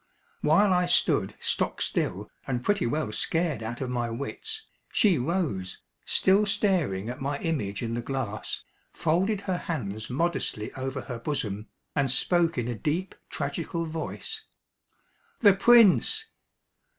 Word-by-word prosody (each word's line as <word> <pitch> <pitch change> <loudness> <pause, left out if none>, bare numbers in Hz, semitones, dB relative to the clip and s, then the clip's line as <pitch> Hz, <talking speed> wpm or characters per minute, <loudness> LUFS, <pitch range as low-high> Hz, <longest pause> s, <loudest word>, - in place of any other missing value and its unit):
While 185 +6 +4
I 180 0 +2
stood 175 - +2
stock - - -1
still - - -1 0.2
and 125 -2 -1
pretty 205 -9 +2
well 150 -2 -1
scared 160 +3 0
out 115 +3 -5
of 130 -2 -2
my 120 -1 -1
wits, 435 - -4 0.3
she 200 - +4
rose, 130 - -2 0.2
still 200 +2 +3
staring 170 - +1
at 125 +2 -5
my 140 +1 -1
image 125 -13 -2
in 115 0 -2
the 120 - -1
glass, 120 -4 -3 0.3
folded 190 +6 +1
her 185 -3 -1
hands 110 - -4
modestly 135 -6 -1
over 135 0 -4
her 120 -2 -6
bosom, 110 -6 -3 0.3
and 140 -2 +2
spoke 170 +5 +3
in 120 -1 -1
a 120 - -1
deep 155 - -2 0.2
tragical 165 0 -3
voice 165 - -5 1.0
"The 205 -4 +8
Prince!" 235 - +5
150 Hz, 140 wpm, -27 LUFS, 120-185 Hz, 1.0 s, The